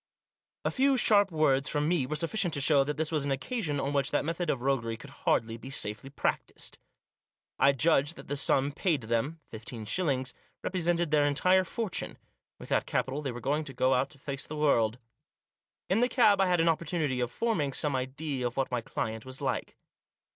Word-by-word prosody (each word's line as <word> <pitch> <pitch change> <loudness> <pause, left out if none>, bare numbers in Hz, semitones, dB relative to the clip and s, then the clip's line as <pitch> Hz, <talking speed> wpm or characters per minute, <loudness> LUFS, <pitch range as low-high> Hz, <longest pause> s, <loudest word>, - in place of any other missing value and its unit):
A - - +1
few 270 0 +3
sharp 205 -4 +5
words 150 -5 +2
from 150 0 0
me 160 -6 +1
were 155 - -2
sufficient 170 +2 0
to - - -1
show 140 0 +5
that 150 +2 -4
this 160 0 -1
was 155 -3 0
an 140 - -2
occasion 150 - -2
on 140 +1 -2
which 140 -1 +1
that 145 - 0
method 165 +1 -2
of 135 - 0
roguery 120 -4 0
could 140 +4 -12
hardly 115 -5 0
be 130 - -10
safely 105 0 -3
practised. 140 - -3 0.8
I 140 - +5
judged 145 +2 +2
that - - -12
the 145 - -2
sum 140 0 +2
paid 160 -1 0
them 115 +8 -1
— - - -36
fifteen 110 0 -7
shillings 130 - 0
— - - -42
represented 175 -3 0
their 145 -1 +4
entire 185 +6 +3
fortune. 215 +2 -3 0.4
With - - -11
that - - +1
capital 135 +3 -1
they 140 -3 -3
were 120 - -7
going 145 +5 0 0.2
out 130 +1 +2
to 150 - -18
face 140 -1 -5
the 155 - -6
world. 120 -7 +2 0.9
In 195 - +2
the 245 +1 +3
cab 210 -6 +4
I 190 - +3
had 180 -1 +2
an 165 - +3
opportunity 160 -5 0
of 120 -1 0
forming 160 - -1
some 145 +1 0
idea 130 0 -2
of 120 - -8
what 135 -1 0
my 125 -1 -1
client 110 0 -4
was 130 0 -7
like. 130 -5 -3
145 Hz, 205 wpm, -29 LUFS, 130-165 Hz, 0.9 s, sharp